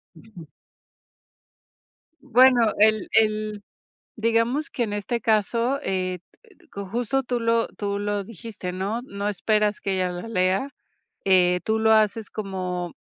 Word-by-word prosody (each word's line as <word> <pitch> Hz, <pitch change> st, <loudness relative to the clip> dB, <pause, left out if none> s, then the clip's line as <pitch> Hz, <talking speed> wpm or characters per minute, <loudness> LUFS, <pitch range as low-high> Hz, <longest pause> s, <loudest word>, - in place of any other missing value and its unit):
Ujú. 175 Hz, -1 st, -13 dB, 1.7 s
Bueno, 250 Hz, -3 st, +4 dB
el 215 Hz, -1 st, +4 dB
el, 215 Hz, -1 st, +1 dB, 0.5 s
digamos 230 Hz, +6 st, 0 dB
que, 240 Hz, -, -1 dB
en 210 Hz, -, -5 dB
este 205 Hz, +3 st, -2 dB
caso, 230 Hz, +4 st, +1 dB
eh, 185 Hz, -3 st, -2 dB, 0.5 s
co 200 Hz, 0 st, -7 dB
justo 240 Hz, +6 st, -1 dB
tú 245 Hz, -1 st, -2 dB
lo 230 Hz, 0 st, +1 dB
tú 200 Hz, -1 st, -4 dB
lo 205 Hz, 0 st, -2 dB
dijiste, 205 Hz, -3 st, -7 dB
¿no?, 200 Hz, +6 st, -3 dB
no 200 Hz, -4 st, -4 dB
esperas 210 Hz, +1 st, 0 dB
que 195 Hz, -, -2 dB
ella 185 Hz, -1 st, 0 dB
la 180 Hz, +5 st, -7 dB
lea. 190 Hz, +3 st, +1 dB, 0.6 s
Eh, 180 Hz, -2 st, +4 dB
tú 220 Hz, 0 st, +1 dB
lo 220 Hz, 0 st, +4 dB
haces 215 Hz, 0 st, +2 dB
como 185 Hz, -4 st, -4 dB
215 Hz, 135 wpm, -24 LUFS, 190-230 Hz, 1.7 s, Bueno